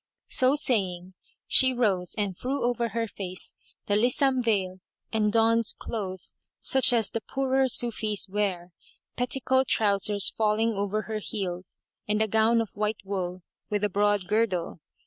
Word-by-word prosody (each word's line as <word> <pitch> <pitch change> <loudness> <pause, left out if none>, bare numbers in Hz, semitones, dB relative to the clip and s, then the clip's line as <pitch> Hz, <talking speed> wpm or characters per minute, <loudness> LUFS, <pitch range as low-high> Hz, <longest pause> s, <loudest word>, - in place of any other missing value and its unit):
So 260 +2 +3
saying, 190 -10 -1 0.3
she 260 -1 +5
rose 195 -7 0
and 200 -3 -1
threw 265 +8 -3
over 240 -1 +1
her 230 +2 -2
face 185 -3 -4 0.3
the 205 - +1
Lisam 255 +4 +2
veil 195 -5 0 0.3
and 210 -1 +2
donned 230 0 +2
clothes 190 -5 -5 0.2
such 265 -2 +2
as 225 -4 +1
the 230 - -3
poorer 265 +1 +1
Sufis 215 -4 0
wear, 190 -3 -2 0.4
petticoat 260 +1 +1
trousers 200 -1 +2
falling 220 +1 +1
over 205 +1 -1
her 220 -1 -4
heels, 185 -4 -5 0.3
and 210 0 +1
a 220 - +2
gown 225 +2 +3
of 225 - -5
white 210 +1 -2
wool 185 -2 -4 0.3
with 210 -1 -1
a 210 - +2
broad 205 0 +1
girdle. 190 -5 0
215 Hz, 145 wpm, -27 LUFS, 195-235 Hz, 0.4 s, she